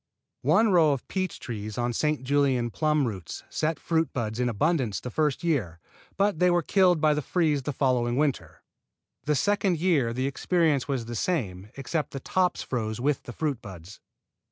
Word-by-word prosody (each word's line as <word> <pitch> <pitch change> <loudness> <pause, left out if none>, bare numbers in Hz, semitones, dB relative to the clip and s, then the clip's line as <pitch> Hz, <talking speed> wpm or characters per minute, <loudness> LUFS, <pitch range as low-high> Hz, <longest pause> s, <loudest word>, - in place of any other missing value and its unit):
One 185 - +4
row 160 -5 +5
of 135 - -6
peach 185 -1 -3
trees 110 -4 -6
on 120 0 -1
St. 150 +2 0
Julien 130 -3 +1
plum 150 +2 +1
roots 95 -8 -6
set 160 +1 -1
fruit 165 -1 0
buds 110 -2 -3
in 125 -1 +1
abundance 120 - 0
the 125 - -7
first 150 +1 0
year, 115 - -1 0.4
but 200 -4 +1
they 180 - +4
were 175 -1 +2
killed 180 -3 +3
by 155 0 +4
the 150 - -1
freeze 155 0 +1
of - - -10
the 150 - -1
following 125 -3 +1
winter. 145 -3 -1 0.6
The 150 - +2
second 195 +3 +1
year 155 -8 +2
the 130 +3 -2
experience 150 -1 +1
was 135 -5 -2
the 120 - -6
same, 105 - -2
except 150 +3 -3
that 135 - -6
the - - -12
tops 185 -1 +1
froze 110 -3 -3
with 140 +2 0
the - - -9
fruit 145 -5 -2
buds. 95 -1 -11
140 Hz, 190 wpm, -27 LUFS, 120-160 Hz, 0.6 s, row